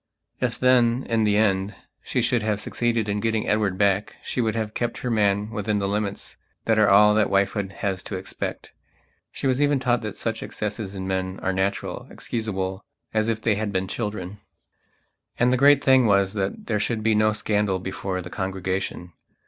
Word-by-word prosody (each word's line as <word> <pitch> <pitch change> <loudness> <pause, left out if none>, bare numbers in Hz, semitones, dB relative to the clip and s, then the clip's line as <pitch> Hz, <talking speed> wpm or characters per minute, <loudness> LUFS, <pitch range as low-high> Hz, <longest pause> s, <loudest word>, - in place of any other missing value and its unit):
If 125 -2 -1
then, 125 -1 +3
in 115 -2 +2
the 105 -1 +3
end, 100 -1 +1 0.3
she - - -1
should 120 -2 +2
have 105 -1 -1
succeeded 115 0 -1
in 105 0 -1
getting 110 0 -1
Edward 105 -3 +1
back 100 0 +1
she 125 - -2
would 110 -2 0
have 110 -1 -2
kept 120 -1 -2
her 125 - 0
man 105 -1 +1
within 105 0 -1
the 100 -1 -1
limits 100 0 -3 0.3
that 110 -1 +3
are 105 - +5
all 105 +1 +7
that 105 -1 +3
wifehood 100 0 +1
has 95 -1 -3
to 100 - -4
expect. 95 +1 -6 0.6
She - - -6
was 130 +1 +2
even 145 -1 +3
taught 125 -1 +1
that 105 -3 -6
such 110 -1 -3
excesses 105 -1 -4
in 95 -1 -4
men 95 0 -2
are 95 - 0
natural, 95 +1 -2
excusableas 95 -4 -3 0.3
if 110 0 +1
they 110 - +3
had 105 0 -2
been 95 -1 -1
children. 105 -2 -4 1.0
And 125 +1 +3
the - - +4
great 140 +2 +5
thing 130 -3 +5
was 100 -1 +3
that 100 -2 -3
there 105 -3 0
should 110 +1 -1
be 110 0 +3
no 110 0 +3
scandal 105 -2 0
before 95 0 -4
the 90 - -9
congregation. 95 -2 -3
105 Hz, 190 wpm, -24 LUFS, 95-115 Hz, 1.0 s, all